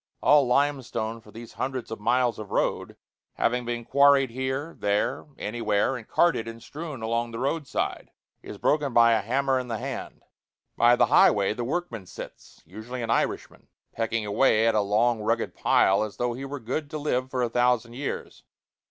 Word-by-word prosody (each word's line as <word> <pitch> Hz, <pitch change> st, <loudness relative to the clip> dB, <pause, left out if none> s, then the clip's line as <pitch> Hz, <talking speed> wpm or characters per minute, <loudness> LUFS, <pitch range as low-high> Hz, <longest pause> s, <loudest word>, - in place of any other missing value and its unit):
All 145 Hz, -3 st, +5 dB
limestone 125 Hz, -4 st, 0 dB
for 110 Hz, -, -18 dB
these 115 Hz, +2 st, -11 dB
hundreds 130 Hz, -3 st, -4 dB
of 110 Hz, -, -5 dB
miles 120 Hz, +2 st, +1 dB
of 105 Hz, -2 st, -7 dB
road, -, -, -1 dB, 0.4 s
having 125 Hz, +1 st, 0 dB
been 120 Hz, 0 st, -4 dB
quarried 140 Hz, -2 st, +4 dB
here, 130 Hz, +5 st, -3 dB
there, 105 Hz, +9 st, -1 dB
anywhere, 105 Hz, +2 st, 0 dB
and 115 Hz, -3 st, -8 dB
carted 165 Hz, -10 st, +2 dB
and 115 Hz, 0 st, -8 dB
strewn 150 Hz, -6 st, -7 dB
along 115 Hz, +1 st, -1 dB
the 115 Hz, -, -7 dB
road 140 Hz, +4 st, -2 dB
side, -, -, -3 dB, 0.3 s
is -, -, -9 dB
broken 145 Hz, -4 st, +1 dB
by 115 Hz, 0 st, +6 dB
a 115 Hz, -, +3 dB
hammer 135 Hz, +3 st, 0 dB
in 125 Hz, -, -5 dB
the 115 Hz, -2 st, -3 dB
hand. -, -, -6 dB, 0.5 s
By 120 Hz, +1 st, +5 dB
the -, -, +4 dB
highway 100 Hz, 0 st, +4 dB
the 120 Hz, -, -4 dB
workman 120 Hz, -, -4 dB
sits -, -, -11 dB
usually 110 Hz, +8 st, -7 dB
an 115 Hz, -, -2 dB
Irishman -, -, -2 dB, 0.3 s
pecking 115 Hz, -1 st, -2 dB
away 110 Hz, +1 st, +3 dB
at 115 Hz, -, +3 dB
a 105 Hz, -, +3 dB
long 110 Hz, +3 st, +2 dB
rugged 115 Hz, +2 st, -1 dB
pile 95 Hz, +1 st, +3 dB
as 105 Hz, -3 st, -4 dB
though 120 Hz, 0 st, -1 dB
he 130 Hz, +3 st, -6 dB
were 140 Hz, +1 st, -6 dB
good 135 Hz, +5 st, -4 dB
to 155 Hz, -, -5 dB
live 130 Hz, -4 st, -1 dB
for 130 Hz, -1 st, -1 dB
a -, -, +1 dB
thousand 120 Hz, 0 st, +1 dB
years. 135 Hz, +3 st, -6 dB
120 Hz, 185 wpm, -26 LUFS, 115-135 Hz, 0.5 s, by